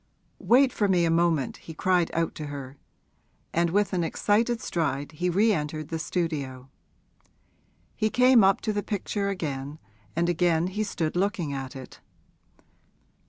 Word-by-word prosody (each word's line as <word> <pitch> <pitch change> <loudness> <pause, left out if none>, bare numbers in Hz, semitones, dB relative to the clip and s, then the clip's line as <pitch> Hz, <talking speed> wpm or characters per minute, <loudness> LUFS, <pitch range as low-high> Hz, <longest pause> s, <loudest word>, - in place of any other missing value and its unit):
'Wait 250 +7 +4
for 205 - +1
me 180 -3 +3
a 165 - +1
moment!' 165 -5 +1
he 160 - -11
cried 180 0 +2
out 165 0 0
to 150 - -6
her; 140 -2 -7 0.8
and 170 +1 +2
with 205 +3 +1
an 175 -2 +1
excited 225 +7 +1
stride 145 -7 -2
he 175 +3 -2
re 210 +5 +3
entered 155 -2 -3
the 165 - -3
studio. 140 -7 -3 1.2
He 215 -1 +1
came 250 -1 +5
up 195 0 +4
to 215 - -1
the 205 - -1
picture 200 0 -2
again, 145 -6 -4 0.4
and 170 +1 +1
again 175 0 +2
he 215 +2 0
stood 165 -6 -2
looking 180 -5 -1
at 135 0 -5
it. 130 -1 -10
170 Hz, 155 wpm, -26 LUFS, 150-200 Hz, 1.2 s, came